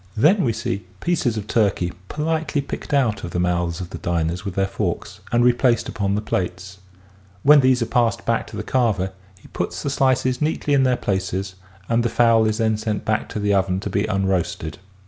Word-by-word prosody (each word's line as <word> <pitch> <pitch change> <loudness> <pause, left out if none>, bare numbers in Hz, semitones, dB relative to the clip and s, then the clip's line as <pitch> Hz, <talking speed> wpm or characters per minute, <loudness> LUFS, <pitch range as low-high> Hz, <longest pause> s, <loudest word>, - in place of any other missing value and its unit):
Then 180 - +4
we 120 - +2
see 110 -4 -4
pieces 150 - 0
of 105 - -4
turkey 100 -6 +1 0.2
politely 155 0 -1
picked 140 - -5
out 120 -8 +1
of 85 - -4
the 90 - -3
mouths 85 -1 0
of 90 -1 -7
the - - -6
diners 85 0 -1
with 100 -3 -5
their 95 - +2
forks 95 - -3
and 120 0 +3
replaced 125 0 +3
upon 100 -2 -1
the 105 - -2
plates. 95 -1 -3 0.6
When 150 +1 +8
these 130 -2 +3
are - - -1
passed 115 -1 +1
back 115 -1 0
to - - -8
the - - -3
carver 105 -7 0 0.3
he - - -17
puts - - -4
the 140 - -1
slices 130 -1 +1
neatly 150 -1 0
in 140 - +4
their 130 -2 +2
places 95 0 -2 0.3
and 115 0 +2
the 120 - 0
fowl 115 -2 +4
is 110 0 0
then 110 -2 +1
sent 110 -1 -3
back 110 -1 0
to - - -4
the 105 0 +1
oven 95 -1 +1
to - - -4
be 100 +2 0
unroasted. 95 -6 -1
110 Hz, 205 wpm, -22 LUFS, 95-125 Hz, 0.6 s, When